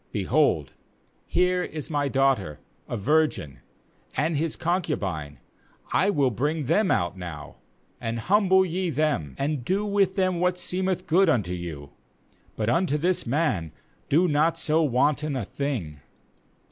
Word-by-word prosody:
^Behold, 100 - +2 0.6
here 180 0 +2
is 155 -3 -6
my 145 -1 +1
daughter 135 - +1 0.3
a 120 - -2
virgin, 115 - 0 0.6
and 160 +2 +1
his 155 +2 -1
concubine; 95 - -2 0.6
I 195 - +3
will 140 -9 +2
bring 145 +7 -1
them 205 - +2
out 85 +2 +1
now, 85 -6 -8 0.4
and 115 0 -2
humble 190 - +3
ye 180 +1 -2
them, 145 - -1
and 140 -2 -1
do 195 - 0
with 200 -2 +1
them 185 -3 +1
what 180 0 +1
seemeth 185 0 -2
good 180 +2 +4
unto 105 - +1
you; 80 -5 -7 0.6
but 105 - -2
unto 150 +5 +2
this 175 0 +1
man 115 - 0 0.4
do 170 +6 +4
not 160 +2 +2
so 160 0 +1
wanton 145 +1 +1
a 125 -6 -2
thing.' 105 - -4
150 Hz, 140 wpm, -25 LUFS, 105-180 Hz, 0.6 s, good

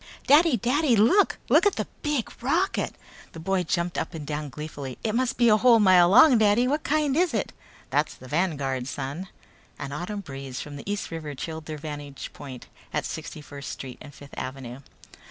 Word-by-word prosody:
"Daddy! 300 -1 +5
Daddy, 255 +4 +2
look! 235 - +4
Look - - +5
at 410 - +1
the - - -2 0.2
big 295 -6 -1
rocket!" 340 - 0
The - - -21
little 160 - -9
boy 195 +1 +1
jumped 170 +1 -1
up - - -4
and 155 -2 -6
down 150 0 -4
gleefully. 145 -3 -7
"It 220 - 0
must 255 +1 0
be 240 - +4
a 215 -1 +6
whole 235 0 +6
mile 185 -4 +6
long, 250 - +7
Daddy! 215 +3 +4
What 295 +4 0
kind 295 -2 +1
is 340 -5 +2
it?" 210 - -2 0.4
"That's 145 +3 +1
the 130 - -13
Vanguard, 140 -6 -1
son." 140 +7 -5 0.5
An 140 -1 -6
autumn 180 +8 -4
breeze 135 -5 -7
from 145 -1 -7
the 145 +8 -6
East 205 -4 -3
River 155 -3 -5
chilled 160 +3 -6
their 155 -1 -5
vantage 145 -2 -7
point 130 -3 -9 0.3
at - - -1
Sixty 155 - -6
First 140 -2 -9
Street 130 -2 -8
and 145 - -10
Fifth 145 0 -14
Avenue. 130 -1 -6
170 Hz, 195 wpm, -26 LUFS, 145-235 Hz, 0.5 s, long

